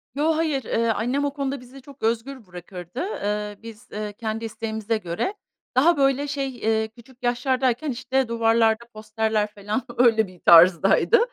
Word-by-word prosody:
Yo, 310 +2 +2
hayır. 300 -6 0
Eee, 230 +1 0
annem 245 +7 0
o 285 - -2
konuda 275 -1 -3
bizi 260 +2 -13
çok 280 -2 -15
özgür 230 +2 -2
bırakırdı, 180 +4 -9
eee, 210 - -3
biz, 230 +1 -11
eee, 210 0 -5
kendi 225 +1 -4
isteğimize 220 0 -3
göre 180 - -3 0.4
Daha, 315 +5 +4
böyle, 275 +1 +2
şey, 275 -1 -2
eee, 220 -1 0
küçük 240 +3 -19
yaşlardayken, 255 +3 0
işte, 255 +1 -1
duvarlarda 230 0 +2
posterler, 215 0 -1
felan, 210 +4 -4
öyle 225 -4 +4
bir 180 -2 -16
tarzdaydı. 185 - +6
230 Hz, 155 wpm, -24 LUFS, 215-270 Hz, 0.4 s, tarzdaydı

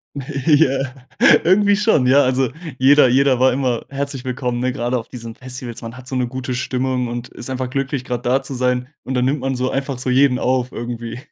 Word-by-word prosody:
Ja, 135 -1 +1 0.5
irgendwie 200 +3 +4
schon, 210 - +2
ja. 140 +3 +6
Also, 130 -1 +1 0.3
jeder 140 +1 +6
jeder 130 +1 +3
war 130 0 +5
immer 125 -3 -1
herzlich 140 -1 -4
willkommen, 125 -1 -2
ne, 130 +1 0
gerade 120 +1 -1
auf 115 - -8
diesen 115 -2 -8
Festivals. 125 -2 -8
Man 115 +1 -7
hat 130 0 -12
so 135 - -3
'ne 125 -1 +1
gute 130 +1 -4
Stimmung 130 0 -1
und 120 +1 -5
ist 120 - -9
einfach 130 -1 -3
glücklich, 135 -1 -2
grad 125 -2 -4
da 130 +2 +2
zu 135 0 -7
sein 125 0 0 0.2
und 130 - -4
dann 125 -1 +1
nimmt 140 +2 0
man 135 0 -1
so 130 +1 -1
einfach 135 -1 -3
so 130 - -4
jeden 130 0 +4
auf 130 0 0
irgendwie. 120 0 -6
130 Hz, 210 wpm, -19 LUFS, 125-135 Hz, 0.5 s, ja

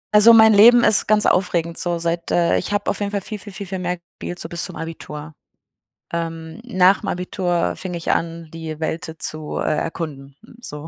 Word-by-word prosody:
Also, 215 +2 +9
mein 220 -1 +7
Leben 235 +4 +7
ist 210 - +4
ganz 215 0 +3
aufregend, 170 -2 +1
so 175 -1 0
seit, 170 0 -2
äh 170 -1 +2
ich - - -5
habe 205 0 -1
auf - - -5
jeden 200 -1 -2
Fall 200 -1 -2
viel, 210 +2 -6
viel, 205 +1 -10
viel, 195 +1 -7
viel 190 0 -5
mehr 180 0 -2
gespielt, 175 +1 -9
so - - -5
bis 170 0 -4
zum 180 - -6
Abitur. 160 -1 -8 0.8
Ähm, 165 +2 -5
nach'm 185 -4 +3
Abitur 175 -1 -1
fing 185 -2 -5
ich 170 -1 -2
an, 165 -1 -3
die 160 -1 -6
Welt, 160 +1 -3
äh, 160 0 -9
zu, 155 0 -4
äh, - - 0
erkunden, 140 -5 -5 0.2
so 150 -8 -5
175 Hz, 205 wpm, -21 LUFS, 165-200 Hz, 0.8 s, Also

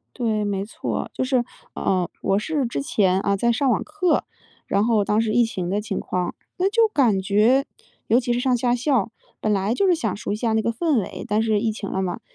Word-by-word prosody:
对， 220 -4 0
没 200 -1 -1
错， 215 - -4
就 - - -1
是 255 -2 +2 0.3
呃， 180 -3 0
我 195 - +1
是 285 +4 -1
之 140 -12 -3
前 185 +4 +2
啊， 200 0 +1
在 235 +4 +1
上 265 +4 +1
网 225 - +1
课， 370 -4 0 0.4
然 200 +2 +1
后 225 -3 +2
当 210 +1 +1
时 225 -1 0
疫 240 +2 +4
情 185 -6 -3
的 205 - 0
情 210 -2 -3
况， 180 -1 -2 0.2
那 375 - +3
就 450 +2 +4
感 240 - +2
觉 215 +8 +3 0.4
尤 235 +4 +4
其 240 0 -1
是 240 - 0
上 250 0 +2
夏 240 0 +1
校， 245 -4 +1 0.3
本 215 - 0
来 200 +2 +1
就 390 - +2
是 360 - +4
想 330 - -2
熟 225 +4 -6
悉 - - 0
一 - - -2
下 225 0 -1
那 220 - +2
个 230 - 0
氛 280 +1 +1
围， - - -7
但 210 +1 +1
是 220 -2 +2
疫 220 -1 0
情 210 -2 -6
了 190 - -1
嘛， 180 -2 -3
225 Hz, 260 characters per minute, -23 LUFS, 200-250 Hz, 0.4 s, 疫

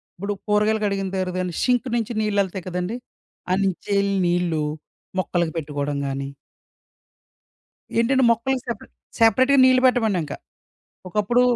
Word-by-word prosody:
ఇప్పుడు 200 +3 -3
కూరగాయలు 210 +1 +2
కడిగిన 195 -1 -1
తర్వాత 185 0 -1 0.2
షింక్ 250 0 +2
నుంచి 230 0 -2
నీళ్ళెళ్తాయి 200 -4 -1
కదండీ! 180 +5 -3 0.6
అన్నించెల్లి 200 +1 0
నీళ్ళు 175 -3 +1 0.6
మొక్కలకి 175 -3 0
పెట్టుకోడం 145 -2 -3
గాని 135 0 -3 1.7
ఏంటంటే 260 +2 +3
మొక్కలకి 250 +3 0
సెపరే 235 - -5 0.3
సెపరేట్‌గా 255 +5 +5
నీళ్ళు 255 0 +5
పెట్టమండింకా. 215 - +1 0.7
ఒకప్పుడు 215 +6 +2
200 Hz, 105 wpm, -23 LUFS, 180-230 Hz, 1.7 s, సెపరేట్‌గా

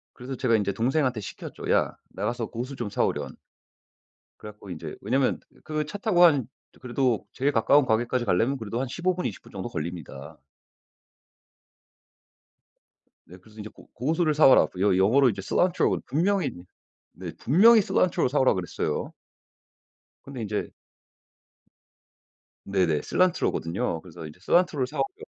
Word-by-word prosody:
그래서 130 +2 -7
제가 120 -3 +2
이제 100 -2 -1
동생한테 130 +1 0
시켰죠. 100 - -7
"야, - - +1
나가서 115 +5 -3
고수 125 +5 -6
좀 120 -5 -4
사 - - +1
오련." - - -3 1.0
그래갖고 105 -2 -11
이제 85 -3 -7
왜냐면 130 +6 +1 0.3
그 155 0 -2
차 155 +7 -7
타고 195 -4 +3
한 145 -8 +4 0.3
그래도 125 -2 -1
제일 140 +3 0
가까운 140 +5 +4
가게까지 120 +1 0
가려면 115 +7 +1
그래도 115 -1 -4
한 135 - -1
15 180 +7 -1
분, 180 - -2
20 110 - -6
분 - - -16
정도 95 +3 -5
걸립니다. 80 - -7 2.9
네, 90 - -13
그래서 110 +3 -15
이제 105 - -7
"고 - - -18
고수를 155 +5 0
사와라." 145 -3 +6
여 95 -1 +3
영어로 120 +9 +4
이제 100 -4 -2
cilantro. 180 - +1
분명히 175 0 +1 0.6
네, 90 -3 -8
분명히 220 - +6
cilantro 185 -7 +1
사 145 +3 0
오라고 130 -6 +3
그랬어요. 90 -2 -3 1.1
근데 135 -4 -7
인제 105 -1 -3 2.0
네네. 90 -6 +1
cilantro 185 -1 +1
거든요. 85 +1 -3
그래서 80 -3 -10
이제 75 +3 -12
cilantro 170 - +2
사 - - -9
오게 405 +2 -3
120 Hz, 350 characters per minute, -26 LUFS, 100-145 Hz, 2.9 s, 사와라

